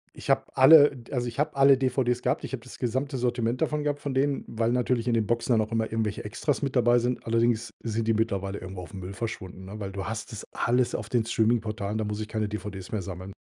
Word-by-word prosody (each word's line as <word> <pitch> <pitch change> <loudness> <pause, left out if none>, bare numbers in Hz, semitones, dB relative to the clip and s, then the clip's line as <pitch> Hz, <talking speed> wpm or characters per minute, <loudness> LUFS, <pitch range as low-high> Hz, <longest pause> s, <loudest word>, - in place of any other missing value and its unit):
Ich - - -9
habe - - +4
alle, 145 +1 +8
d 120 -3 -13
also 125 -2 0
ich 120 - -6
habe 150 0 0
alle 135 0 +6
DVDs 125 -2 +1
gehabt. - - 0
Ich - - -6
habe 120 -3 -4
das 125 - -12
gesamte 130 +3 -1
Sortiment 120 -1 -1
davon 150 -2 0
gehabt 145 -1 -1
von 140 -1 -4
denen, 140 +1 +1
weil 115 +1 0
natürlich 125 -1 0
in 120 - +2
den 110 -3 +1
Boxen 120 +2 +1
dann 110 - +4
auch 110 - -17
immer 110 -1 -1
irgendwelche 110 -2 -2
Extras 140 +7 -1
mit 140 -2 -2
dabei 120 -1 +5
sind. 125 +1 -2
Allerdings 115 0 +1
sind 115 -1 -2
die 115 - +4
mittlerweile 100 -3 -1
irgendwo 95 0 -7
aufm 95 +2 -9
Müll 95 +1 -7
verschwunden, 95 -4 -6
ne, 100 +3 -8
weil 100 -2 -4
du 95 -1 -5
hast 110 +2 -5
das 110 -2 -7
alles 125 +1 +1
auf 105 0 -5
den 120 -2 +1
Streaming-Portalen, 110 -2 0
da 110 - -1
muss 105 0 -3
ich 110 - -4
keine 110 -2 -2
DVDs 105 -3 -6
mehr 110 - -1
sammeln. 95 +1 -7
115 Hz, 250 wpm, -27 LUFS, 105-125 Hz, -, alle